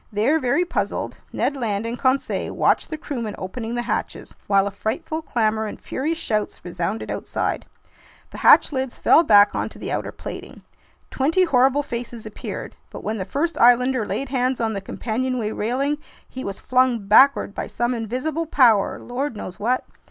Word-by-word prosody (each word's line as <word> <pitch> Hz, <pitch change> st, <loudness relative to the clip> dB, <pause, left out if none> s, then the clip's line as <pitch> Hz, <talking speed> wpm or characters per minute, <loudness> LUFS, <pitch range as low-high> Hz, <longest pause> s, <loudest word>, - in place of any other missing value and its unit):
There, 230 Hz, +10 st, +2 dB
very 280 Hz, +7 st, +1 dB
puzzled, -, -, -3 dB
Ned 285 Hz, -, 0 dB
Land 220 Hz, -5 st, -2 dB
and 230 Hz, +1 st, -3 dB
Conseil 260 Hz, +2 st, 0 dB
watched -, -, +2 dB
the 310 Hz, -, -4 dB
crewmen 240 Hz, -9 st, -5 dB
opening 225 Hz, +5 st, -5 dB
the 240 Hz, -, -1 dB
hatches, -, -, -4 dB
while 195 Hz, -1 st, +4 dB
a 200 Hz, -, -2 dB
frightful 315 Hz, -, -3 dB
clamor 220 Hz, -6 st, 0 dB
and -, -, -7 dB
furious 315 Hz, +5 st, -3 dB
shouts 215 Hz, -, -2 dB
resounded 180 Hz, +4 st, -3 dB
outside. -, -, -3 dB, 0.6 s
The -, -, -9 dB
hatch -, -, +6 dB
lids 260 Hz, -2 st, -2 dB
fell -, -, +6 dB
back 205 Hz, -9 st, +6 dB
onto -, -, -3 dB
the -, -, -5 dB
outer -, -, -2 dB
plating. -, -, -9 dB, 0.5 s
Twenty 320 Hz, +8 st, +2 dB
horrible 270 Hz, -2 st, +3 dB
faces 235 Hz, -3 st, -6 dB
appeared. 215 Hz, -, -7 dB
But -, -, -9 dB
when 215 Hz, 0 st, -2 dB
the 185 Hz, -, -3 dB
first 300 Hz, -, -2 dB
islander 250 Hz, 0 st, +5 dB
laid 270 Hz, +5 st, -3 dB
hands 255 Hz, -1 st, 0 dB
on 225 Hz, -1 st, 0 dB
the 200 Hz, -, -4 dB
companionway 235 Hz, +2 st, -2 dB
railing, 270 Hz, +8 st, -1 dB, 0.3 s
he 260 Hz, -, -7 dB
was 200 Hz, -1 st, -5 dB
flung 250 Hz, -4 st, +2 dB
backward 220 Hz, +1 st, +5 dB
by -, -, -4 dB
some 240 Hz, +1 st, -1 dB
invisible 255 Hz, +8 st, -3 dB
power, 235 Hz, -9 st, +4 dB
lord 250 Hz, 0 st, -4 dB
knows 185 Hz, -2 st, -7 dB
what! 245 Hz, +5 st, 0 dB
245 Hz, 170 wpm, -22 LUFS, 215-275 Hz, 0.6 s, hatch